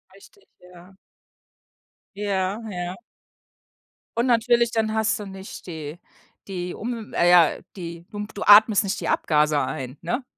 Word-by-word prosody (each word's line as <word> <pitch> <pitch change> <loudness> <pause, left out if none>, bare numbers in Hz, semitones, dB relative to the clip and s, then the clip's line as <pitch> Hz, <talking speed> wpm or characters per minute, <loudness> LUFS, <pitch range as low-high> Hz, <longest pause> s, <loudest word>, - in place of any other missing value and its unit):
Richtig, 400 - -20 0.3
ja. 180 +2 -16 1.2
Ja, 200 0 -1
ja. 180 +2 -5 1.2
Und 235 - +2
natürlich, 235 0 +3
dann 220 -1 0
hast 220 -1 +1
du 210 - -6
nicht 190 -1 -10
die 160 0 -7 0.5
die 180 -2 -4
um 230 -1 -6
äh, 175 - +3
ja, 175 -3 +5 0.2
die 170 -2 -8
humf 210 0 -6
du 200 - -8
atmest 215 +1 +7
nicht 195 -1 -2
die - - -4
Abgase 150 -1 +2
ein, 130 +1 -5
ne? 250 +3 -2
195 Hz, 140 wpm, -24 LUFS, 175-220 Hz, 1.2 s, atmest